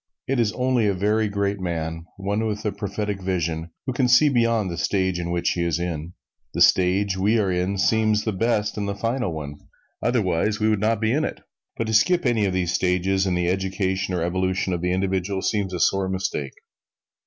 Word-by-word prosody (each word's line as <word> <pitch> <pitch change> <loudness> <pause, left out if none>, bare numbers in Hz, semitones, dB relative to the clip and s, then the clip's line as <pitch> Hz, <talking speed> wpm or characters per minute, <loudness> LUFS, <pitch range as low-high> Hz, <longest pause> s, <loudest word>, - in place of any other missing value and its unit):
It 135 -1 0
is 110 -3 +2
only 125 -3 +1
a 100 - +1
very 105 +3 +1
great 100 0 -1
man 80 -2 -3
one 100 +3 -1
with 105 0 -4
a 105 - +1
prophetic 105 -1 -4
vision 85 -3 -2 0.2
who 130 - -2
can 125 0 +2
see 125 +5 +6
beyond 115 -6 +1
the 85 - -5
stage 95 +2 0
in 85 0 -3
which 85 0 0
he 85 - -1
is. 85 -2 0
The 85 -1 -7
stage 95 +1 +4
we 105 +4 +3
are 100 -4 +1
in 90 +2 -1
seems 110 +1 +2
the 110 - -1
best 105 0 0
and 100 - -2
the 100 - -2
final 115 -2 -1
one 75 -2 -6 0.4
otherwise, 105 -3 +1
we 110 0 +2
would 105 -2 +1
not 110 +1 +1
be 110 0 +2
in 150 +5 +1
it. - - -4 0.4
But 115 - -1
to 110 - -3
skip 175 +11 +3
any 115 -4 +2
of 95 - 0
these 90 -1 0
stages 95 +2 +1
in 90 - +1
the 90 0 0
education 95 0 -1
or 85 - -1
evolution 95 +1 0
of 85 - -2
the 90 0 0
individual 95 +1 -1
seems 100 -3 0
a 90 - -4
sore 95 +1 +2
mistake. 95 -7 -3
95 Hz, 210 wpm, -23 LUFS, 90-110 Hz, 0.4 s, see